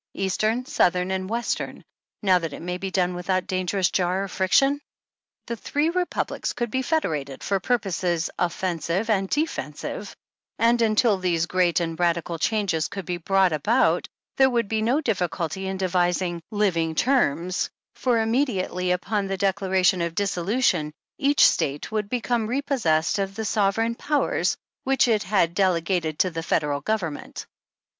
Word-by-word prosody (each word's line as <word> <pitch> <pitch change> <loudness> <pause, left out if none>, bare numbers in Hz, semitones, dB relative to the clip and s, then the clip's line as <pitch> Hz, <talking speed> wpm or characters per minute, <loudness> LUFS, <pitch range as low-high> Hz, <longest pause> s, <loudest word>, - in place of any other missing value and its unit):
Eastern, 215 +6 0
Southern 180 -5 +1
and 190 0 -2
Western, 235 +2 -3 0.4
now 185 -2 +4
that 165 -4 -5
it - - -8
may 180 +1 -3
be 195 - -3
done 180 -1 +1
without 185 +1 -1
dangerous 185 0 0
jar 185 +1 +1
or - - -4
friction? 270 +11 +2 0.6
The 235 - -3
three 295 +7 -1
republics 360 0 -2
could 240 -2 -3
be 260 - 0
federated 155 - -2
for 195 -1 0
purposes 185 -6 0
offensive 180 +3 -1
and 195 -2 +1
defensive, 310 +2 -3 0.4
and 235 +1 +3
until 215 -2 +3
these 170 -3 +1
great 180 -1 +2
and 165 -1 -3
radical 170 -1 0
changes 195 -6 0
could 195 -3 -7
be 180 0 -2
brought 190 +1 +2
about 210 - +2 0.3
there 265 0 +6
would 235 -4 0
be 220 +1 -1
no 230 +3 +2
great 305 0 -1
difficulty 190 -3 -1
in 190 0 -3
devising 180 -1 0
'^living 170 -7 0
terms," 185 - +1 0.2
for 245 -3 +1
immediately 220 -7 0
upon 195 +3 0
the 195 0 -2
Declaration 190 -1 +2
of 170 -1 -2
Dissolution, 190 -4 +1 0.3
each 285 0 +5
State 145 +6 -1
would 210 -2 -2
become 240 -2 -1
repossessed 235 - +1
of 195 0 -2
the 220 - -3
sover 210 +1 +1
eign 235 - -3
powers 295 +4 0 0.3
which 270 -1 +3
it 220 -3 +2
had 185 -4 +1
delegated 170 -4 +1
to 185 - +2
the 165 0 -4
Federal 145 -3 0
Government. 180 -6 -3
190 Hz, 155 wpm, -24 LUFS, 175-225 Hz, 0.6 s, there